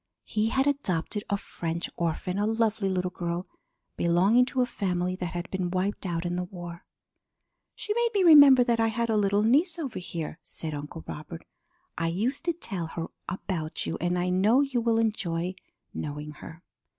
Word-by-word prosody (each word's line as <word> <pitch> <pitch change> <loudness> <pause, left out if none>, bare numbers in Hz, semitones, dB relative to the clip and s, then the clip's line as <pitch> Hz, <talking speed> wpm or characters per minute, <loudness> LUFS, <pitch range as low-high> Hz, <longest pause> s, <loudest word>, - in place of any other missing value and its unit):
He 215 +1 0
had 265 +3 +2
adopted 210 - -1
a 200 - +1
French 170 -3 -4
orphan, 170 +3 -2
a 210 - +1
lovely 220 -2 +1
little 180 -1 -1
girl 175 0 -3 0.5
belonging 190 +9 +4
to 255 0 +1
a - - +1
family 180 -5 -1
that 180 -2 -4
had 175 0 -4
been 185 -2 -1
wiped 190 +2 -1
out 170 0 -2
in 175 0 -1
the 180 - -1
war. 175 -2 -9 0.9
"She 420 - -2
made 475 +1 +2
me 395 - +4
remember 285 -6 +9
that 235 -2 +1
I 225 - +4
had 230 +1 0
a - - +2
little 205 0 +2
niece 305 +10 +3
over 285 -7 -4
here," 170 -2 -5
said 160 -2 -5
Uncle 150 +3 -6
Robert. 160 +2 -8 0.5
"I 165 - +1
used 225 - -1
to 340 - +2
tell 195 - -5
her 165 0 -5 0.2
about 175 -3 -3
you, - - -3
and 175 +1 +1
I 180 +1 0
know 205 +8 +4
you 270 -4 0
will 230 -1 +2
enjoy 185 -6 0 0.4
knowing 150 0 -5
her." 165 +3 -11
190 Hz, 185 wpm, -27 LUFS, 170-230 Hz, 0.9 s, remember